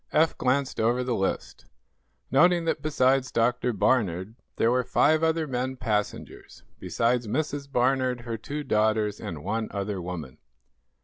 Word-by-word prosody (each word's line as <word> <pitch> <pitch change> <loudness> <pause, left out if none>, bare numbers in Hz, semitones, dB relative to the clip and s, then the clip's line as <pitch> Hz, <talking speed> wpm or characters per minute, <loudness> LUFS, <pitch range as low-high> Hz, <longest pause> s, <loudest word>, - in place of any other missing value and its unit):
Eph 160 +1 +3
glanced 135 +1 0
over 120 +3 +2
the 125 -1 -1
list, 95 -3 -3 0.7
noting 175 -1 +4
that 165 -2 -1
besides 135 -3 +2
Dr. 120 +1 +1
Barnard, 100 -4 0 0.2
there 115 - +2
were 125 0 +2
five 150 +5 +3
other 160 0 +1
men 130 -1 -3
passengers, 105 -4 -4 0.2
besides 120 0 0
Mrs. 145 +2 -3
Barnard, 130 -1 +1
her 115 -1 -4
two 145 +7 -5
daughters 110 -3 +1
and 75 -3 -6
one 110 +1 -2
other 100 -1 -3
woman. 85 -7 -7
125 Hz, 140 wpm, -26 LUFS, 110-135 Hz, 0.7 s, noting